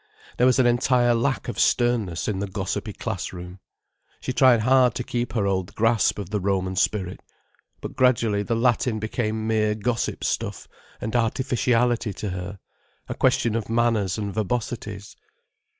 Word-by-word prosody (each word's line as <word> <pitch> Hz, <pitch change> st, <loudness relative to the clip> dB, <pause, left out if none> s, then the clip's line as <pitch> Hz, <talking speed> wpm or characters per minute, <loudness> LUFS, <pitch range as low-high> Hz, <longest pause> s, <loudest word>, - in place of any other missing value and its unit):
There 125 Hz, -, +4 dB
was 130 Hz, -, +4 dB
an 130 Hz, -, +4 dB
entire 120 Hz, 0 st, +3 dB
lack 120 Hz, +4 st, 0 dB
of 120 Hz, -, -4 dB
sternness 115 Hz, -9 st, +1 dB
in 105 Hz, -3 st, -1 dB
the 100 Hz, -, -2 dB
gossipy 95 Hz, -, -3 dB
class -, -, -4 dB
room. 90 Hz, +1 st, -9 dB, 0.6 s
She 130 Hz, -, -4 dB
tried 125 Hz, -3 st, +5 dB
hard 125 Hz, 0 st, +4 dB
to 125 Hz, -, -2 dB
keep 120 Hz, -2 st, -3 dB
her 110 Hz, -4 st, 0 dB
old 95 Hz, 0 st, -1 dB
grasp 115 Hz, 0 st, +2 dB
of 100 Hz, -2 st, -6 dB
the 105 Hz, -, 0 dB
Roman 95 Hz, -1 st, -1 dB
spirit. 95 Hz, -1 st, -1 dB, 0.6 s
But -, -, -7 dB
gradually 115 Hz, -5 st, +2 dB
the 115 Hz, +3 st, -1 dB
Latin 120 Hz, -1 st, +1 dB
became 110 Hz, 0 st, -2 dB
mere 110 Hz, -1 st, +1 dB
gossip 115 Hz, +2 st, -2 dB
stuff -, -, -3 dB, 0.3 s
and 110 Hz, +2 st, -4 dB
artificiality 120 Hz, -1 st, +1 dB
to 105 Hz, -, -5 dB
her, 90 Hz, +2 st, -6 dB, 0.5 s
a -, -, -3 dB
question 115 Hz, -, +2 dB
of 115 Hz, -2 st, -3 dB
manners 115 Hz, -5 st, +1 dB
and 100 Hz, -2 st, -3 dB
verbosities. 105 Hz, -1 st, -4 dB
110 Hz, 160 wpm, -24 LUFS, 100-120 Hz, 0.6 s, tried